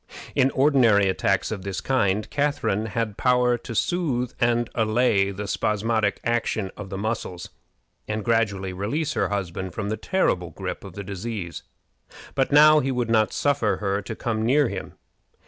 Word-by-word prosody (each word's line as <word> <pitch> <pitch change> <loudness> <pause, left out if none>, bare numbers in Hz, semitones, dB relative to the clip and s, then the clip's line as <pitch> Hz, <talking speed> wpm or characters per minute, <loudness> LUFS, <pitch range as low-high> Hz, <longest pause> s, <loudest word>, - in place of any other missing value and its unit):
In 135 -1 +3
ordinary 125 -8 +4
attacks 95 +1 0
of 105 -3 -4
this 95 0 -4
kind 105 -5 +1
Catharine 140 -7 0
had 110 -1 -3
power 125 -1 +3
to 115 - -8
soothe 130 - 0
and 120 0 +2
allay 110 -3 +2
the 100 +1 -5
spasmodic 105 +1 0
action 110 -4 -1
of 105 -2 -8
the 95 - -5
muscles, 105 -4 -4 0.6
and 110 0 -3
gradually 100 -5 0
release 140 - -2
her - - 0
husband 95 -2 -4
from 100 -2 -3
the 110 - -2
terrible 90 - 0
gripe 80 - -6
of 95 - -10
the 100 +1 -6
disease, 100 -2 -5 0.7
but 135 0 0
now 155 +1 +7
he 135 -1 -1
would 120 -3 -1
not 110 -2 +3
suffer 140 -7 +1
her 100 -1 -1
to 110 +3 -6
come 110 -1 -2
near 135 +3 +3
him. 95 -1 -6
110 Hz, 165 wpm, -24 LUFS, 100-125 Hz, 0.7 s, now